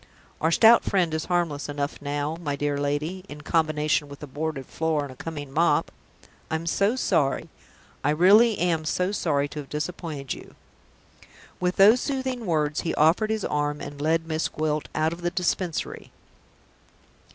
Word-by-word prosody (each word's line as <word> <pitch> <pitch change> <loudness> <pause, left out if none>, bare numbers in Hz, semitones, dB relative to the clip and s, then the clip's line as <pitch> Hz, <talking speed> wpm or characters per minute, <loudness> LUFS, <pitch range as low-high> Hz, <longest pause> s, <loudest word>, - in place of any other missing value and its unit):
Our 160 - +3
Stout 225 +7 +6
Friend 180 -5 +1
is 160 0 -2
harmless 170 -5 -1
enough 145 0 -3
now, 145 +2 -2
my 145 -4 -2
dear 145 0 -1
lady 150 +6 -2
in 150 0 -9
combination 155 -2 +1
with 140 +1 -10
a - - -3
boarded 145 -1 -4
floor 160 0 -1
and 140 - -7
a - - -12
coming 145 -1 -7
mop! 165 +4 +2 0.6
I'm 160 +1 -2
so 200 +7 +1
sorry; 140 - +1 0.5
I - - +2
really 200 +8 +5
am 170 -2 +1
so 180 +4 0
sorry 145 -8 0
to 150 - -6
have 140 - -8
disappointed 150 -3 -4
you." - - -12 1.0
With 180 0 0
those 215 +5 +6
soothing 260 -5 -3
words, 150 -3 0
he 165 - -2
offered 165 +8 +3
his 220 -2 -1
arm, 145 0 -1
and 145 0 -8
led 165 +2 +1
Miss 160 0 -1
Gwilt 155 -1 -2
out 155 +1 +1
of 170 - -9
the 175 - 0
Dispensary. 180 -1 -2
160 Hz, 165 wpm, -25 LUFS, 145-180 Hz, 1.0 s, Stout